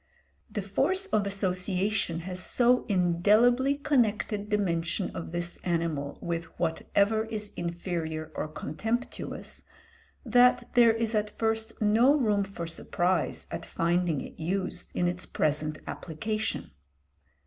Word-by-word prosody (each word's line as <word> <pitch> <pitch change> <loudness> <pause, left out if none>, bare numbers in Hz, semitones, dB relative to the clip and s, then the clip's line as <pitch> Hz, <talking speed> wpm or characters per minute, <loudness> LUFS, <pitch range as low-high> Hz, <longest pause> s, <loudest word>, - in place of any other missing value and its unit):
The - - -3
force 380 +1 +1
of 210 - +1
association 190 -1 0
has 180 +1 -5
so 250 0 +3
indelibly 210 +8 +4
connected 220 -7 +1
the 210 - +3
mention 175 -1 -1
of 165 - -5
this 175 0 -4
animal 165 -5 -1
with 170 -1 -2
whatever 200 +6 +1
is 215 -2 -5
inferior 170 -2 -3
or - - -3
contemptuous, 225 - -4 0.6
that 245 +1 +4
there 235 -2 +7
is 225 0 -1
at 210 -1 +1
first 225 0 -1
no 230 +7 +5
room 210 -8 +2
for 195 -3 -6
surprise 175 +1 -1
at - - -4
finding 170 -3 0
it - - -10
used 185 +4 -2
in 175 - +2
its 180 +1 -3
present 155 0 0
application. 215 - -3
195 Hz, 125 wpm, -28 LUFS, 170-220 Hz, 0.6 s, there